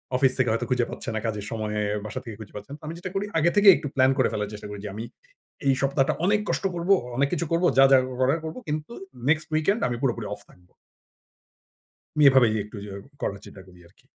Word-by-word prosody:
Office 130 0 +4
থেকে 130 -3 +2
হয়তো 115 - -1
খুঁজে 125 -2 +2
পাচ্ছে - - -6
না - - 0
কাজের 105 -2 -3
সময়ে 105 -1 -2 0.2
বাসা 110 +4 -5
থেকে 115 -3 -7
খুঁজে 110 - -11
পাচ্ছে 105 0 -9
না। 145 - -7
আমি 160 - -5
যেটা 180 +2 -6
করি 195 +1 0
আগে 170 +3 +4
থেকেই 205 -1 +8
একটু 145 - -5
প্ল্যান 130 0 +5
করে - - +3
ফেলার 105 -1 -2
চেষ্টা 105 0 -8
করি 105 0 -7
যে - - -4
আমি 110 - -5 0.6
এই 135 - +5
সপ্তাহটা 135 0 +2
অনেক 210 +2 +3
কষ্ট - - -1
করব, 170 +2 -4 0.3
অনেক 140 0 +3
কিছু 170 -1 -1
করব 170 +2 +1
যা, 135 - +8
যা 135 - +8 0.2
করার 135 +6 +2
করব 160 - -5
কিন্তু 150 +8 -3 0.3
নেক্সসট 155 +1 +2
উইকেন্ড 175 +8 +2
আমি 120 - -2
পুরোপুরি 120 -5 -1
অফ 105 - -9
থাকব। 90 0 -22 1.5
আমি 150 - +5
এভাবেই 125 -5 +4
একটু 105 +1 -11
যে - - -9 0.3
করার 100 - -2
চেষ্টা 95 - -12
করি 90 -1 -17
আরকি। 95 - -29
130 Hz, 225 wpm, -25 LUFS, 105-155 Hz, 1.5 s, থেকেই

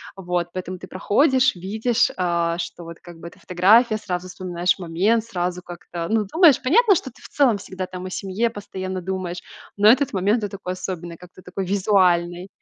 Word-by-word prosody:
вот. 180 -2 -2
Поэтому 185 0 -5
ты 185 - -10
проходишь, 260 - +2
видишь, 220 +6 0
э, 170 -2 0
что 170 0 -6
вот 170 0 -10
как 175 -2 -13
бы 170 - -9
это - - -14
фотография, 215 +6 +4
сразу 185 -3 -5
вспоминаешь 180 0 -1
момент, 190 +7 +1
сразу 180 -3 -3
как-то, 175 -1 -7
ну, 220 -1 +1
думаешь 325 -6 +5
понятно, 400 - +4
что 260 -5 -4
ты - - -21
в - - -11
целом 255 -8 +2
всегда 185 -1 -6
там 185 0 -8
о 185 - -5
семье 195 +5 -2
постоянно 190 -3 -6
думаешь, 185 -1 -4 0.3
но 205 +1 +5
этот 265 +2 +1
момент- 205 +4 +1
это 200 -1 -4
такой 185 -1 -5
особенный, 175 -2 -6
как-то 180 +1 -15
такой 190 +1 -5
визуальный. 185 -2 +1
185 Hz, 185 wpm, -22 LUFS, 175-215 Hz, 0.3 s, думаешь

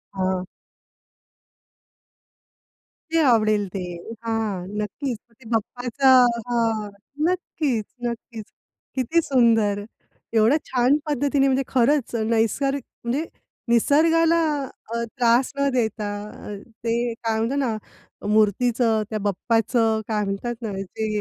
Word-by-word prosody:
हं. 185 -1 -1 2.7
ते 330 - +3
आवडेल 215 -5 +3
ते. 195 - -3 0.4
हां, 220 -5 -2 0.2
नक्कीच 240 +4 -3
मग 230 - -28
ते 230 - -16
बाप्पाचं 245 +3 +3 0.2
हां. 225 -3 0 0.4
नक्कीच, 295 - -1 0.2
नक्कीच. 235 -2 -6 0.5
किती 290 +7 +2
सुंदर! 225 -7 +3 0.5
एवढं 225 +7 +4
छान 255 +3 +3
पद्धतीने 285 -1 +1
म्हणजे 265 0 +2
खरंच, 265 0 +2 0.2
नैसर 270 +5 +1
म्हणजे 275 +2 -4 0.4
निसर्गाला 325 +7 +4 0.5
अ, 235 - -1
त्रास 245 +1 +3
न 280 0 +2
देता, 220 -3 0 0.2
अ, 210 - -8 0.3
ते 230 0 +1 0.2
काय 225 -1 -2
म्हणतो 230 +5 0
ना, 225 -3 -1 0.6
मूर्तीचं, 220 +1 +3
त्या 215 -1 -2
बाप्पाचं, 225 +2 +1
काय 210 -2 0
म्हणतात 200 +5 -3
ना, 220 -3 -3
ते 215 +3 -4
235 Hz, 110 wpm, -23 LUFS, 220-265 Hz, 2.7 s, एवढं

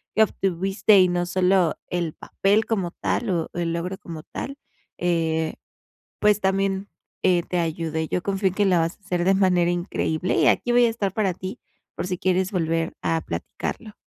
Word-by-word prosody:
que 220 - +6
obtuviste 195 +1 +2
y 185 - +6
no 175 0 0
solo 180 -1 +2
el 170 -3 -2
papel 205 +3 +1
como 195 -6 -1
tal 235 +4 -2
o 170 -3 0
el 170 -1 -1
logro 180 +3 -3
como 165 -5 -8
tal, 275 +2 -6 0.4
eh, 160 -2 0 0.7
pues, 210 -1 +3
también 195 +1 0 0.3
eh, 180 -2 +3
te 180 -1 -2
ayude. 160 -1 -2
Yo 180 - -1
confío 195 0 0
en - - -7
que 205 - +2
la 185 -3 +4
vas 165 +1 -1
a - - -44
hacer 180 -2 -1
de 195 +1 +4
manera 180 -3 +3
increíble 175 -1 -1
y - - +4
aquí 245 - +2
voy 240 0 +5
a - - +3
estar 205 -4 -2
para 195 -4 +1
ti, 185 +1 -6 0.4
por - - -3
si 180 -1 -2
quieres 185 0 +1
volver 165 -3 0
a 165 -1 +1
platicarlo. 215 -3 -5
185 Hz, 190 wpm, -24 LUFS, 170-195 Hz, 0.7 s, que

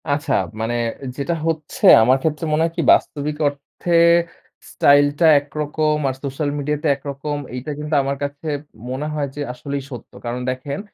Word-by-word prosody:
আচ্ছা। 145 +2 0 0.3
মানে 115 +2 -1 0.4
যেটা 155 +4 -1
হচ্ছে 165 - -2 0.2
আমার 130 +3 +4
ক্ষেত্রে 155 +1 -1
মনে 155 +1 +2
হয় 165 0 -1
কি - - +2
বাস্তবিক 150 0 -1
অর্থে, 145 +4 -2 0.7
স্টাইল 145 0 +5
টা 165 - +5
একরকম, 150 +1 -1
আর - - -2
সোশ্যাল 140 +2 -2
মিডিয়া 150 +1 -1
তে - - +1
একরকম, 140 +1 -5 0.2
এইটা 125 +4 -5
কিন্তু 150 +1 -2
আমার 140 +1 -2
কাছে 140 +2 -5 0.4
মনে 135 +4 -3
হয় 145 -2 -1
যে 145 - -5
আসলেই 140 +2 -5
সত্য। 125 -5 -9
কারণ 120 +1 -3
দেখেন 130 +2 -5
145 Hz, 165 wpm, -20 LUFS, 140-150 Hz, 0.7 s, স্টাইল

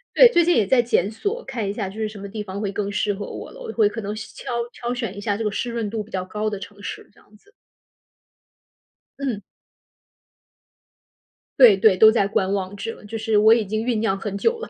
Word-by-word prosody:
对， - - +9
最 345 - +5
近 350 +1 +3
也 210 - +2
在 250 +3 +5
检 215 -4 +1
索， 405 - -3
看 235 -6 -3
一 200 - -1
下 205 -2 -3
就 195 +3 -9
是 215 -1 -2
什 215 - -11
么 200 - -7
地 210 +1 -5
方 200 0 -6
会 205 -2 -2
更 200 0 -3
适 205 0 0
合 200 +1 -6
我 - - -8
了。 - - -13
我 470 - -5
会 215 -3 +3
可 225 +2 -4
能 205 0 -4
挑 220 +3 -8 0.2
挑 240 0 -4
选 230 -6 -4
一 205 - -6
下 205 0 -1
这 225 - -3
个 210 - +1
湿 235 +4 -3
润 230 -3 -2
度 220 0 -3
比 210 - -19
较 185 -1 -3
高 210 +3 -2
的 205 -2 -5
城 205 0 -11
市， - - -7
这 - - -23
样 210 - -22
子。 410 - -27 1.7
嗯。 250 -7 -2 2.2
对 230 -7 +8
对， 195 -1 +5
都 220 +2 +8
在 210 -4 +2
观 195 -1 0
望 195 0 -2
着， 210 +3 -6
就 225 +2 -5
是 220 -1 +1
我 220 +2 +7
已 230 -2 +1
经 215 +3 -2
酝 235 -4 0
酿 205 -3 0
很 200 -1 -4
久 460 - +1
了。 470 - -7
215 Hz, 255 characters per minute, -22 LUFS, 200-230 Hz, 2.2 s, 对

